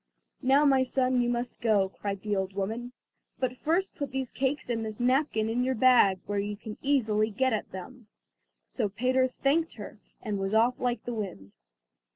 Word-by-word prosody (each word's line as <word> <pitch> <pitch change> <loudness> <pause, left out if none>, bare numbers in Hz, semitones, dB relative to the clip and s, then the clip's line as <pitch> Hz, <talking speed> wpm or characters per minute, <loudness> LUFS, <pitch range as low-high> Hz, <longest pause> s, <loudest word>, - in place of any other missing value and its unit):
"Now, 275 +3 +4
my 270 -2 +5
son, 255 -1 +1
you 240 - +1
must 240 0 -3
go," 210 -5 +3
cried 200 0 -5
the 210 -1 0
old 190 0 -2
woman 225 +5 -3 0.5
"but 255 -1 -1
first 340 +8 0
put 285 -2 -4
these 265 -1 -3
cakes 270 +1 -1
and 230 -2 -1
this 215 -1 -6
napkin 250 -3 +2
in 235 +3 0
your 260 +1 0
bag, 220 -6 +5
where 205 0 -1
you 205 +1 -3
can 215 0 -9
easily 220 -6 +2
get 260 +4 +1
at 215 - -3
them." 220 +5 -9 0.6
So 220 -5 -2
Peter 255 +5 +2
thanked 290 +6 0
her - - -10 0.2
and 210 -3 -3
was 195 +2 -1
off 235 +3 +3
like 245 -1 -1
the 245 - -3
wind. 185 - -6
240 Hz, 190 wpm, -28 LUFS, 210-260 Hz, 0.6 s, my